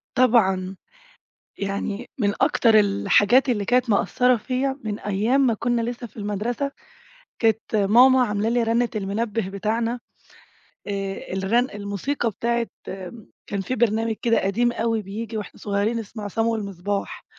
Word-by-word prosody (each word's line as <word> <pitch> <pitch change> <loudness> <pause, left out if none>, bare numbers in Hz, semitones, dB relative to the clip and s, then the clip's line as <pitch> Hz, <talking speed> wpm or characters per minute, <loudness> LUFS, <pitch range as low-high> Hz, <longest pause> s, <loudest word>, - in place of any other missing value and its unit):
طبعًا. 195 -7 +3 0.8
يعني 200 +3 -3
من 205 -2 +2
أكتر 235 -5 +4
الحاجات 205 +5 +3
اللي 210 -5 +1
كانت 245 +1 +2
مأثّرة 250 +4 +3
فيّا 265 +4 -2
من 210 -1 -3
أيام 210 +7 +1
ما 235 - +2
كنّا 235 +2 0
لسه 240 +1 -4
في 215 - -21
المدرسة، 220 +6 -2 0.7
كانت 220 -1 +1
ماما 245 +6 +6
عاملة 210 0 -1
لي 240 +1 +2
رنّة 230 +1 +1
المنبه 210 +1 -2
بتاعنا 225 +5 -2 0.9
آآ 195 -2 -4
الغن 210 +7 +1
الموسيقى 205 +6 -2
بتاعة 235 +2 -1 0.2
م 190 +3 -8 0.2
كان 200 -1 -2
في 250 +7 -3
برنامج 225 -1 +1
كده 230 -1 +3
قديم 235 +5 +1
أوي 225 -1 -1
بييجي 215 +3 -6
واحنا 210 -3 -7
صغيّرين 205 +3 0
اسمه 220 0 -8
عصام 225 +3 -1
والمصباح، 200 -3 -3
220 Hz, 140 wpm, -23 LUFS, 200-240 Hz, 0.9 s, ماما